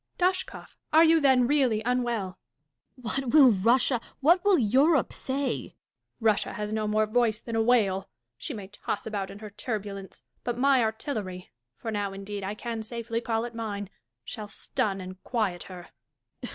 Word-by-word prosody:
Dashkof, 370 Hz, +1 st, -1 dB, 0.2 s
are 320 Hz, +2 st, +7 dB
you, 325 Hz, 0 st, +6 dB
then, 265 Hz, -4 st, +4 dB
really 250 Hz, -5 st, +2 dB
unwell 235 Hz, -7 st, -1 dB, 0.3 s
% 135 Hz, -, -29 dB
Dashkof. -, -, -16 dB, 0.2 s
What 260 Hz, -2 st, -4 dB
will 280 Hz, -5 st, +8 dB
Russia, 235 Hz, +4 st, +3 dB, 0.2 s
what 340 Hz, +6 st, +4 dB
will 405 Hz, -3 st, +5 dB
Europe, 270 Hz, +6 st, +3 dB
sayl 270 Hz, +1 st, -2 dB
Catharine. -, -, -17 dB, 0.4 s
Russia 220 Hz, -3 st, +1 dB
has 210 Hz, 0 st, -4 dB
no 215 Hz, -1 st, 0 dB
more 215 Hz, +1 st, +2 dB
voice 220 Hz, 0 st, +1 dB
than 230 Hz, -1 st, -6 dB
a 225 Hz, -, +3 dB
whale. 210 Hz, -5 st, +2 dB, 0.3 s
She 120 Hz, -, -6 dB
may 200 Hz, -3 st, -7 dB
toss 205 Hz, +1 st, -4 dB
about 205 Hz, -3 st, -3 dB
in -, -, -9 dB
her 210 Hz, 0 st, -9 dB
turbulence; 205 Hz, -2 st, -6 dB, 0.2 s
but 240 Hz, -1 st, -2 dB
my 270 Hz, +1 st, +4 dB
artilleiy 220 Hz, -5 st, -3 dB, 0.3 s
(for 225 Hz, -, -5 dB
now, 205 Hz, -2 st, -2 dB
indeed, 200 Hz, +1 st, -6 dB
I 200 Hz, +2 st, -3 dB
can 230 Hz, 0 st, -4 dB
safely 230 Hz, +1 st, -4 dB
call 225 Hz, -1 st, -1 dB
it 240 Hz, -, -7 dB
mine) 205 Hz, -3 st, -4 dB, 0.3 s
shall 215 Hz, -3 st, -6 dB
stun 195 Hz, -1 st, -2 dB
and 185 Hz, 0 st, -9 dB
quiet 215 Hz, -8 st, -1 dB
her. 180 Hz, -2 st, -10 dB
225 Hz, 175 wpm, -27 LUFS, 205-250 Hz, 0.4 s, will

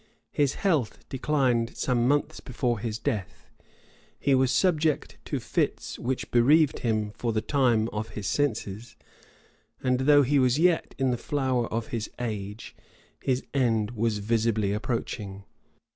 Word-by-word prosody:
His 145 Hz, -2 st, +1 dB
health 155 Hz, -, -1 dB
declined 130 Hz, -4 st, 0 dB
some 120 Hz, -2 st, +1 dB
months 145 Hz, +1 st, +1 dB
before 120 Hz, -2 st, -2 dB
his 110 Hz, 0 st, -3 dB
death; 100 Hz, -5 st, -4 dB, 0.7 s
he 140 Hz, -, +2 dB
was 130 Hz, -1 st, +3 dB
subject 155 Hz, +2 st, +1 dB
to -, -, -2 dB
fits, -, -, -2 dB
which 130 Hz, +1 st, -3 dB
bereaved 140 Hz, +5 st, +4 dB
him, 110 Hz, -3 st, -1 dB
for 115 Hz, +2 st, -2 dB
the 110 Hz, -, 0 dB
time, 115 Hz, -2 st, +2 dB
of 110 Hz, 0 st, -4 dB
his 105 Hz, -, -4 dB
senses; 115 Hz, -4 st, -2 dB, 0.9 s
and 125 Hz, -1 st, +2 dB
though 145 Hz, +2 st, +5 dB
he 140 Hz, +2 st, +2 dB
was 130 Hz, 0 st, +3 dB
yet 170 Hz, +1 st, +2 dB
in 135 Hz, -2 st, +1 dB
the 120 Hz, -, 0 dB
flower 130 Hz, -3 st, -1 dB
of 115 Hz, 0 st, -3 dB
his 115 Hz, -2 st, -3 dB
age, 105 Hz, -2 st, -5 dB, 0.5 s
his 130 Hz, -1 st, 0 dB
end 115 Hz, -5 st, +1 dB
was 115 Hz, -2 st, 0 dB
visibly 110 Hz, -1 st, +1 dB
approaching. 105 Hz, -3 st, -4 dB
120 Hz, 145 wpm, -27 LUFS, 110-135 Hz, 0.9 s, though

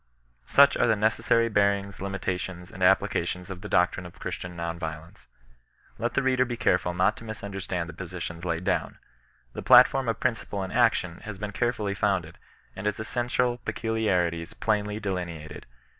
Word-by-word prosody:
Such 140 Hz, 0 st, +6 dB
are -, -, +3 dB
the 115 Hz, -, +4 dB
necessary 110 Hz, +2 st, +2 dB
bearings, 100 Hz, -2 st, +1 dB
limitations, 95 Hz, -2 st, -4 dB
and -, -, -10 dB
ap -, -, +6 dB
plications 90 Hz, +1 st, -3 dB
of 90 Hz, -1 st, -7 dB
the 105 Hz, -, -7 dB
doctrine 90 Hz, 0 st, +2 dB
of 85 Hz, -, -16 dB
Christian 90 Hz, 0 st, -5 dB
non 85 Hz, 0 st, -4 dB
resistance. 80 Hz, 0 st, -7 dB, 0.7 s
Iiet 120 Hz, 0 st, -1 dB
the 140 Hz, -, +1 dB
reader 130 Hz, -1 st, +3 dB
be 120 Hz, -1 st, -4 dB
careful 90 Hz, -6 st, +1 dB
not 95 Hz, +4 st, +3 dB
to -, -, -10 dB
misunderstand 100 Hz, -5 st, -4 dB
the 85 Hz, -, -8 dB
posi 90 Hz, +1 st, -7 dB
tions 85 Hz, 0 st, -6 dB
laid 85 Hz, -1 st, -2 dB
down. 90 Hz, 0 st, -1 dB, 0.6 s
The -, -, -5 dB
platform 135 Hz, -3 st, +6 dB
of 115 Hz, -, -1 dB
principle 115 Hz, -5 st, -1 dB
and 95 Hz, -, -6 dB
action 110 Hz, -7 st, +2 dB
has 105 Hz, -2 st, -6 dB
been 105 Hz, +1 st, -4 dB
carefully 110 Hz, -2 st, -1 dB
founded, 95 Hz, -5 st, -1 dB, 0.4 s
and 100 Hz, +2 st, -4 dB
its 105 Hz, -, -1 dB
essential 120 Hz, +2 st, 0 dB
peculiarities 90 Hz, -9 st, -1 dB
plainly 105 Hz, -1 st, -1 dB
delineated. 85 Hz, -6 st, -5 dB
100 Hz, 170 wpm, -27 LUFS, 90-110 Hz, 0.7 s, Such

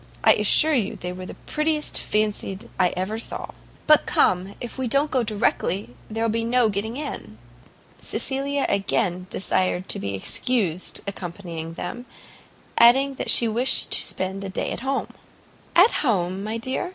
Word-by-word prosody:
I -, -, +7 dB
assure 315 Hz, 0 st, +5 dB
you 225 Hz, -8 st, 0 dB
they 180 Hz, 0 st, -6 dB
were 185 Hz, 0 st, -8 dB
the -, -, -9 dB
prettiest 305 Hz, 0 st, -1 dB
fancied 210 Hz, -2 st, -2 dB
I 180 Hz, -1 st, +4 dB
ever 200 Hz, +5 st, -2 dB
saw. -, -, -3 dB, 0.4 s
But 305 Hz, -1 st, +5 dB
come, 185 Hz, +2 st, +2 dB
if 240 Hz, -, -7 dB
we 260 Hz, -, -1 dB
don't 280 Hz, +5 st, +1 dB
go 260 Hz, -, +2 dB
directly, 205 Hz, -, -1 dB, 0.2 s
there 225 Hz, +1 st, -2 dB
will 230 Hz, -, +1 dB
be 230 Hz, +1 st, -1 dB
no 235 Hz, 0 st, +3 dB
getting 215 Hz, +4 st, -3 dB
in." 270 Hz, -, -6 dB, 0.6 s
Cecilia 275 Hz, +1 st, 0 dB
again 195 Hz, -2 st, 0 dB
desired 185 Hz, -1 st, -1 dB
to -, -, -1 dB
be 100 Hz, 0 st, -3 dB
excused 185 Hz, -, -1 dB
accompanying 170 Hz, -4 st, -6 dB
them, 240 Hz, +9 st, -6 dB, 0.7 s
adding 265 Hz, +4 st, +6 dB
that -, -, -3 dB
she 235 Hz, -, +5 dB
wished 235 Hz, +4 st, +2 dB
to -, -, +2 dB
spend 190 Hz, +1 st, -2 dB
the 195 Hz, -, -5 dB
day 190 Hz, -, -2 dB
at -, -, -4 dB
home. 270 Hz, +2 st, -2 dB, 0.7 s
"At 370 Hz, +7 st, +7 dB
home, 190 Hz, -, 0 dB
my 215 Hz, +2 st, -3 dB
dear?" 260 Hz, +9 st, -3 dB
215 Hz, 165 wpm, -23 LUFS, 185-255 Hz, 0.7 s, I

